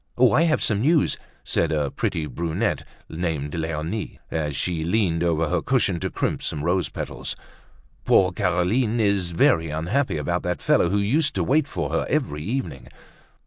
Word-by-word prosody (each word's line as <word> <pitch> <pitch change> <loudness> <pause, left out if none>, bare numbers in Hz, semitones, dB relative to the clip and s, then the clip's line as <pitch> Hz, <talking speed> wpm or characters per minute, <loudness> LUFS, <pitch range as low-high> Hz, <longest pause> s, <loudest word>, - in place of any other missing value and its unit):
"Oh, 125 -1 +5
I 155 - +4
have 155 - +1
some 105 -2 +1
news," 155 +3 +3 0.3
said 85 - 0
a 75 -3 0
pretty 80 - -2
brunette 80 +4 -2 0.2
named 80 -4 -3
Leonie 80 +5 -3
as 75 -3 -2
she 85 +1 -1
leaned 85 -2 +1
over 80 -2 +1
her 85 +1 0
cushion 105 -8 +1
to - - -2
crimp - - -2
some 75 -1 -3
rose 90 +1 +1
petals. - - -5 0.7
"Poor 90 -1 +4
Caroline 100 +6 +1
is 100 -4 +2
very 80 -1 +3
unhappy 85 - 0
about 75 - -1
that - - -2
fellow 85 - +3
who 100 - +1
used 140 +10 +1
to 95 - +1
wait 145 - +2
for - - -3
her - - 0
every 125 - -1
evening." 80 - -4
85 Hz, 170 wpm, -24 LUFS, 80-110 Hz, 0.7 s, Oh